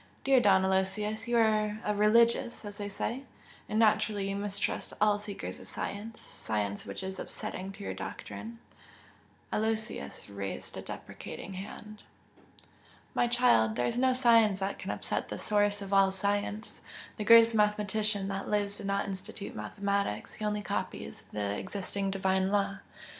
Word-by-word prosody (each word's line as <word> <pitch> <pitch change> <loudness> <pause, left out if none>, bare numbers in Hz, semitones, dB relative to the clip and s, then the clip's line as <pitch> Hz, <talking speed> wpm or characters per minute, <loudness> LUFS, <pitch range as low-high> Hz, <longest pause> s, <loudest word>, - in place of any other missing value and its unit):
"Dear 270 -1 +5
Don 190 -4 +5
Aloysius, 210 +4 0
you 240 0 +2
are 215 -1 +2
a 210 - +1
'religious' 230 +2 +3
as 205 +1 -8
they 205 0 -3
say 235 +5 -3 0.5
and 215 - -1
naturally 215 -2 +3
you - - -2
mistrust 200 0 -2
all 210 0 +4
seekers 205 -1 -6
of - - -11
science 220 +3 -5
science 105 -2 -3
which 100 - -5
is 190 0 -5
upsetting 190 +1 -5
to 200 - -9
your - - -3
doctrine." 230 +1 -7 1.0
Aloysius 220 - -2
raised 100 -8 -5
a - - -5
deprecating 195 - -8
hand. 210 +2 -8 1.1
"My 240 - +3
child, 235 - +4
there 120 - +1
is 120 - 0
no 260 0 +4
science 230 -6 +5
that 195 +1 -2
can - - -6
upset - - -2
the - - -4
Source 205 -1 +1
of 200 0 -5
all 195 -1 +6
science! 205 +2 -2 0.4
The 215 - -2
greatest 230 +1 +8
mathematician 210 -1 +1
that 195 0 -3
lives 205 -1 0
did 195 - -5
not 200 0 +1
institute 195 0 -6
mathematics 200 - -2
he 215 - -5
only 210 0 -1
copies - - -4
the 100 -1 -1
existing 195 0 -3
Divine 190 0 +1
law." 200 -1 +1
205 Hz, 155 wpm, -30 LUFS, 195-215 Hz, 1.1 s, greatest